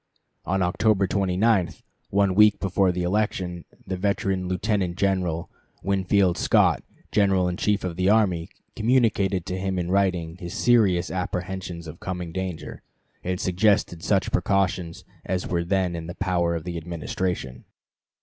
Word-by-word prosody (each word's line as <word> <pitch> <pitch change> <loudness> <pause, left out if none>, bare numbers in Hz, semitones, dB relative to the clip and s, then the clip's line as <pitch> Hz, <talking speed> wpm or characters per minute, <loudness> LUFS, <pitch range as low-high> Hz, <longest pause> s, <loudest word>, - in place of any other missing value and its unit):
On 95 +1 +1
October 100 +3 +2
29, 95 0 +1 0.3
one 100 -1 +2
week 105 +1 +5
before 95 -1 +2
the 90 0 -2
election, 90 -2 -1 0.2
the 95 - -3
veteran 95 -1 -1
Lieutenant 90 -1 -1
General 90 -4 0 0.4
Winfield 95 -1 +2
Scott, - - +3 0.3
General 95 -3 +3
in 90 - -1
Chief 105 +2 0
of 90 -2 -4
the 95 +1 +2
Army, 95 -6 +2 0.3
communicated 110 -6 +2
to 95 0 -3
him 95 0 -2
in 90 0 -2
writing 90 -4 +1
his 85 -2 -7
serious 100 -8 +3
apprehensions 90 -2 -4
of 80 +1 -9
coming 90 -2 -5
danger, 95 -1 -5 0.4
and 90 0 -2
suggested 95 -2 +1
such 100 -3 +1
precautions 90 -2 0 0.2
as 90 0 -2
were 85 -1 0
then 90 -1 0
in 80 -1 -6
the 85 - -7
power 90 -3 0
of 80 - -4
the 90 -1 -5
Administration. 85 -4 -4
95 Hz, 145 wpm, -25 LUFS, 85-100 Hz, 0.4 s, week